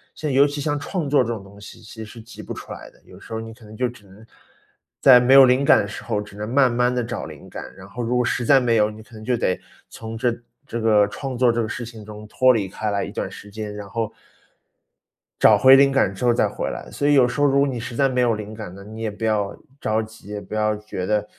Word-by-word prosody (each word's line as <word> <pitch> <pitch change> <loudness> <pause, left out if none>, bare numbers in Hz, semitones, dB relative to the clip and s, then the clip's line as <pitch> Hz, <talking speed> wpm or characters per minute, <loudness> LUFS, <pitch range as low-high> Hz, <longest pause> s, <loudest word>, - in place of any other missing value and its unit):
像 155 - -4
尤 135 +2 +5
其 145 0 -3
像 145 +1 -1
创 160 +1 -3
作 140 -2 +4
这 115 - -5
种 110 -4 -5
东 100 +1 -15
西， 100 - -12
其 110 0 -10
实 - - -8
是 110 +2 -12
急 115 - -12
不 - - -10
出 - - -10
来 - - -9
的， - - -26
有 - - -15
时 - - -15
候 110 - -3
你 115 0 -8
可 115 - -19
能 105 0 -12
就 125 +1 +1
只 120 -4 -13
能， 100 +4 -17 0.7
在 130 -2 +8
没 125 +2 +4
有 135 - +10
灵 130 +2 +3
感 - - +6
的 100 - 0
时 100 - -8
候， 110 -3 -2
只 105 -1 -9
能 105 +2 -5
慢 130 -1 +3
慢 125 +1 +2
地 125 -1 -1
找 115 - -5
灵 - - -11
感， - - -8
然 95 0 -12
后 120 +4 -7
如 120 +1 -1
果 125 0 +2
实 120 - -1
在 135 +3 +5
没 120 -3 +2
有， 105 0 +3
你 110 0 -11
可 115 - -22
能 110 -1 -10
就 125 +1 0
得 95 -5 0 0.3
从 115 0 -8
这 120 +1 0 0.3
这 120 -4 -5
个 105 -2 +4
创 130 +4 -6
作 125 -1 +4
这 115 0 -1
个 110 - -3
事 120 0 -5
情 110 -2 -11
中 105 0 -10
脱 130 +4 +4
离 105 -5 -1
开 105 +3 -4
来 100 -1 -1
一 - - -6
段 - - -4
时 105 - -12
间， 105 0 -6
然 105 -1 -8
后 115 +1 -3 1.3
找 - - +6
回 130 0 +8
灵 140 0 +5
感 135 -8 +2
之 100 +6 -4
后 120 - +4
再 - - +2
回 - - -4
来。 - - -8
所 145 - -1
以 145 - +4
有 130 -3 +5
时 125 +3 -4
候 145 - +4
如 140 -1 +3
果 140 - +3
你 130 -3 -3
实 115 +1 -7
在 135 +2 +2
没 125 -1 -1
有 120 -2 +3
灵 105 0 -6
感 110 -5 -8
了， 100 - -11
你 110 +2 -10
也 110 - -1
不 105 +2 -9
要 105 -2 0 0.2
着 110 +1 0
急， 110 -2 -14
也 105 0 -4
不 100 - -11
要 110 0 +1
觉 105 -3 -6
得 105 +1 0
115 Hz, 315 characters per minute, -22 LUFS, 105-125 Hz, 1.3 s, 有